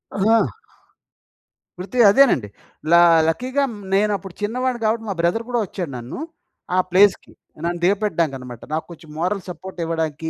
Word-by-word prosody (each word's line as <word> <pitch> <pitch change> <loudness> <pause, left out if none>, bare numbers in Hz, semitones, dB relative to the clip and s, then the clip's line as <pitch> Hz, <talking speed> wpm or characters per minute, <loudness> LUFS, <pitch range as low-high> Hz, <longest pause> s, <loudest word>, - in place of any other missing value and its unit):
ఆహా! 220 +3 +3 1.4
వృత్తి 220 +7 -4
అదేనండి. 205 - +4 0.4
ల - - +5 0.3
లక్కీగా 255 - 0 0.3
నేనప్పుడు 200 -2 0
చిన్నవాడిని 245 +3 -1
గాబట్టి 225 +1 0
మా - - 0
బ్రదర్ 200 +7 +1
గూడా 240 -1 0
ఒచ్చాడు 175 -5 -6
నన్ను. 120 - -7 0.6
ఆ - - +2
ప్లేస్‌కి. 195 +1 +3 0.3
నన్ను 175 0 -2
దిగపెట్టడానికన్నమాట. 160 - -1
నాకు 160 - -2
కొంచెం 160 -1 -13
మోరల్ 185 +4 -1
సపోర్ట్ 180 +1 -9
ఇవ్వడానికి, 160 -1 -3
190 Hz, 130 wpm, -21 LUFS, 165-220 Hz, 1.4 s, ల